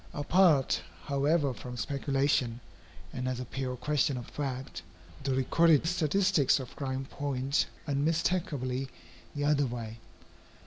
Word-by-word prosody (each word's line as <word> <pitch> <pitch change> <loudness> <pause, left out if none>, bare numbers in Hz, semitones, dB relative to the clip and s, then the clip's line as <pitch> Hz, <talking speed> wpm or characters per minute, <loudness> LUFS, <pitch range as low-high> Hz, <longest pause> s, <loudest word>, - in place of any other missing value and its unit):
Apart, 155 -2 +3 0.2
however, 140 0 +1
from 125 0 -8
speculation, 135 -2 0 0.5
and 125 0 -3
as 130 -1 -2
a 125 - -4
pure 130 0 -4
question 140 +1 0
of 120 - -6
fact, 130 -10 -5 0.4
the 135 -1 0
recorded 155 +4 +4
statistics 175 -3 +2
of 130 -2 -8
crime 135 -1 -3
point 140 0 -1 0.2
unmistakably 145 -3 0 0.5
the 145 0 -1
other 145 -2 +3
way. 115 -2 -6
140 Hz, 120 wpm, -30 LUFS, 130-150 Hz, 0.5 s, recorded